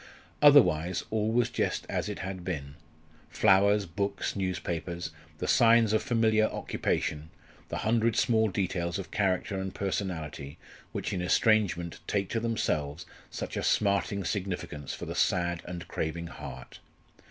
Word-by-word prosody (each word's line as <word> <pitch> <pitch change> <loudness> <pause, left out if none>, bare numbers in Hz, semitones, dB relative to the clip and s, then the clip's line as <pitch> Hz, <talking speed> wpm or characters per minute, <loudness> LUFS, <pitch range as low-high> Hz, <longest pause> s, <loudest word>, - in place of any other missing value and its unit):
Otherwise, 90 - +5
all 110 0 +1
was 120 0 +2
just - - -1
as - - -2
it - - -4
had 95 -2 -5
been 70 -6 -4 0.6
flowers, 100 +1 +4
books, 100 +4 -2
newspapers 90 -2 -3 0.3
the - - -3
signs 115 -2 +5
of 110 - +3
familiar 110 -2 +3
occupation, 75 +1 -2 0.4
the - - -3
hundred 115 0 +2
small 110 -2 +3
details 90 -2 -1
of 95 - -7
character 95 0 0
and 95 0 -5
personality 80 -8 -3 0.3
which - - -3
in 90 - -1
estrangement 90 -3 +2
take 100 -2 0
to 115 - 0
themselves 80 -10 -1 0.2
such - - -5
a - - -1
smarting 100 -1 +1
significance 90 -7 -3
for - - -7
the - - -5
sad 85 -1 +1
and 90 -1 -6
craving 85 +2 -3
heart. 65 -6 -9
95 Hz, 140 wpm, -29 LUFS, 85-110 Hz, 0.6 s, Otherwise